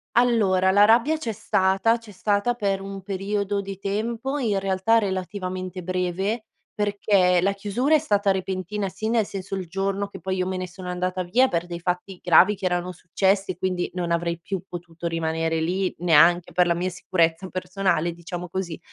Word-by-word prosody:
Allora, 210 Hz, -6 st, +3 dB
la 205 Hz, +2 st, +6 dB
rabbia 240 Hz, +8 st, +4 dB
c'è 240 Hz, -7 st, -3 dB
stata, 195 Hz, +2 st, +2 dB
c'è 230 Hz, -2 st, -14 dB
stata 205 Hz, +4 st, 0 dB
per 200 Hz, -4 st, -1 dB
un 195 Hz, 0 st, -7 dB
periodo 200 Hz, +1 st, -2 dB
di 195 Hz, -1 st, -7 dB
tempo 230 Hz, +7 st, -2 dB
in 220 Hz, -8 st, 0 dB
realtà 195 Hz, +4 st, +2 dB
relativamente 185 Hz, -2 st, -4 dB
breve, 185 Hz, +5 st, -2 dB, 0.3 s
perché 200 Hz, -3 st, +2 dB
la 195 Hz, +2 st, +2 dB
chiusura 210 Hz, +9 st, +1 dB
è -, -, +5 dB
stata 205 Hz, -9 st, +1 dB
repentina, 190 Hz, +1 st, -2 dB
sì, 220 Hz, +4 st, -4 dB
nel 225 Hz, -2 st, +2 dB
senso, 195 Hz, 0 st, -5 dB
il 190 Hz, -1 st, -4 dB
giorno 195 Hz, +3 st, -2 dB
che -, -, -10 dB
poi 190 Hz, 0 st, -2 dB
io 185 Hz, -1 st, 0 dB
me 185 Hz, 0 st, -2 dB
ne 185 Hz, 0 st, -4 dB
sono 180 Hz, +1 st, -10 dB
andata 180 Hz, +1 st, -2 dB
via 235 Hz, +9 st, +3 dB
per 170 Hz, -6 st, -1 dB
dei 175 Hz, -1 st, -6 dB
fatti 180 Hz, +1 st, -3 dB
gravi 180 Hz, +4 st, +6 dB
che 195 Hz, -, -6 dB
erano 180 Hz, 0 st, 0 dB
successi 190 Hz, +3 st, 0 dB
e 175 Hz, -, -9 dB
quindi 185 Hz, -1 st, -1 dB
non 175 Hz, -2 st, -2 dB
avrei 170 Hz, 0 st, -1 dB
più 190 Hz, +1 st, -4 dB
potuto 170 Hz, -1 st, -6 dB
rimanere 165 Hz, 0 st, -1 dB
lì 185 Hz, +3 st, 0 dB
neanche 170 Hz, +1 st, +4 dB
per 180 Hz, -1 st, +3 dB
la 170 Hz, -, +2 dB
mia 180 Hz, +2 st, -1 dB
sicurezza 170 Hz, 0 st, 0 dB
personale, 185 Hz, -2 st, -1 dB
diciamo 175 Hz, +1 st, -7 dB
così. 175 Hz, -2 st, -4 dB
190 Hz, 185 wpm, -24 LUFS, 180-205 Hz, 0.3 s, la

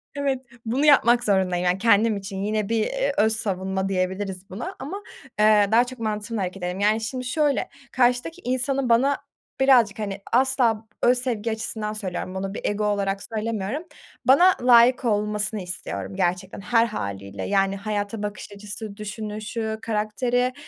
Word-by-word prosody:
Evet, 280 Hz, -2 st, 0 dB, 0.3 s
bunu 255 Hz, +6 st, +1 dB
yapmak 245 Hz, -5 st, +5 dB
zorundayım, 185 Hz, -4 st, +1 dB
yani, 180 Hz, +1 st, +2 dB
kendim 220 Hz, +1 st, +3 dB
için. 195 Hz, 0 st, -7 dB
Yine 215 Hz, 0 st, -1 dB
bir, 230 Hz, 0 st, +1 dB
eee, -, -, -1 dB
öz 220 Hz, +1 st, +3 dB
savunma 190 Hz, -2 st, -2 dB
diyebiliriz 190 Hz, 0 st, -2 dB
buna 195 Hz, +6 st, -6 dB
ama, 390 Hz, +9 st, -6 dB, 0.4 s
eee, 210 Hz, -1 st, +5 dB
daha 230 Hz, +2 st, +6 dB
çok 250 Hz, 0 st, -9 dB
mantığımla 215 Hz, 0 st, -3 dB
hareket 185 Hz, 0 st, -4 dB
ederim. 180 Hz, +1 st, -3 dB
Yani, 215 Hz, +2 st, +2 dB
şimdi 250 Hz, +3 st, -4 dB
şöyle, 290 Hz, +1 st, 0 dB, 0.2 s
karşıdaki 250 Hz, +8 st, +1 dB
insanın 255 Hz, +1 st, 0 dB
bana 265 Hz, +5 st, +4 dB, 0.4 s
birazcık, 245 Hz, -6 st, +4 dB
hani, 200 Hz, -2 st, -4 dB
asla 245 Hz, -3 st, +3 dB, 0.2 s
öz 250 Hz, +1 st, +5 dB
sevgi 235 Hz, -3 st, -2 dB
açısından 220 Hz, -1 st, -3 dB
söylüyorum, 185 Hz, -3 st, -4 dB
bunu 195 Hz, +1 st, -3 dB
bir -, -, -6 dB
ego 205 Hz, +1 st, 0 dB
olarak 200 Hz, -1 st, -1 dB
söylemiyorum, 220 Hz, -, -3 dB, 0.4 s
bana 350 Hz, +8 st, +6 dB
layık 245 Hz, +1 st, +6 dB
olmasını 210 Hz, -1 st, 0 dB
istiyorum 100 Hz, -, -5 dB
gerçekten, 180 Hz, -, -1 dB
her 230 Hz, +2 st, +3 dB
hâliyle. 100 Hz, -, -5 dB
Yani, 195 Hz, -1 st, +1 dB
hayata 205 Hz, +1 st, -3 dB
bakış 210 Hz, 0 st, -6 dB
açısı, 205 Hz, +1 st, -8 dB
düşünüşü, 215 Hz, +1 st, -4 dB
karakteri, 230 Hz, +4 st, 0 dB
215 Hz, 150 wpm, -24 LUFS, 195-245 Hz, 0.4 s, daha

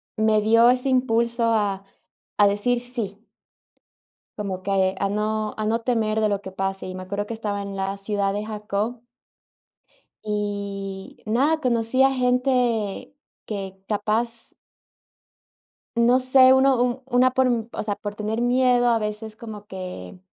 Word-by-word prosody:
me 220 Hz, -1 st, +3 dB
dio 230 Hz, +3 st, +5 dB
ese 255 Hz, +2 st, +2 dB
impulso 235 Hz, -2 st, +1 dB
a 205 Hz, -4 st, +1 dB, 0.6 s
a 205 Hz, -, +7 dB
decir 205 Hz, +5 st, +1 dB
sí. 230 Hz, -4 st, -5 dB, 1.1 s
Como 190 Hz, -3 st, -4 dB
que 190 Hz, -1 st, +1 dB
a 195 Hz, -, 0 dB
no 215 Hz, +1 st, -1 dB
a 215 Hz, -, -2 dB
no 225 Hz, +2 st, +1 dB
temer 220 Hz, -3 st, 0 dB
de 215 Hz, -, +2 dB
lo 200 Hz, -1 st, -1 dB
que 190 Hz, -2 st, -9 dB
pase, 195 Hz, 0 st, -3 dB
y 185 Hz, -, -6 dB
me 185 Hz, -, -6 dB
acuerdo 200 Hz, +2 st, -4 dB
que 230 Hz, -, -5 dB
estaba 205 Hz, -2 st, -3 dB
en 200 Hz, 0 st, -6 dB
la 195 Hz, +1 st, -2 dB
ciudad 200 Hz, 0 st, 0 dB
de 205 Hz, +1 st, -3 dB
Jacob. 215 Hz, +2 st, -3 dB, 1.2 s
Y 200 Hz, -2 st, -4 dB
nada, 275 Hz, +9 st, +2 dB
conocí 240 Hz, -1 st, +1 dB
a 270 Hz, -, +5 dB
gente 250 Hz, -4 st, 0 dB, 0.3 s
que 195 Hz, -2 st, -6 dB
capaz 225 Hz, +2 st, -1 dB, 1.5 s
No 240 Hz, +2 st, +4 dB
sé, 255 Hz, 0 st, +6 dB
uno 265 Hz, -1 st, +4 dB
u 250 Hz, +2 st, -2 dB
una 255 Hz, 0 st, +3 dB
por 260 Hz, 0 st, +3 dB, 0.2 s
o -, -, -3 dB
sea, 205 Hz, -2 st, -2 dB
por 205 Hz, -1 st, -6 dB
tener 215 Hz, +2 st, -3 dB
miedo, 245 Hz, 0 st, +3 dB
a 230 Hz, -1 st, +2 dB
veces 215 Hz, +1 st, -4 dB
como 215 Hz, -2 st, -9 dB
que 185 Hz, -, -8 dB
215 Hz, 150 wpm, -23 LUFS, 200-245 Hz, 1.5 s, a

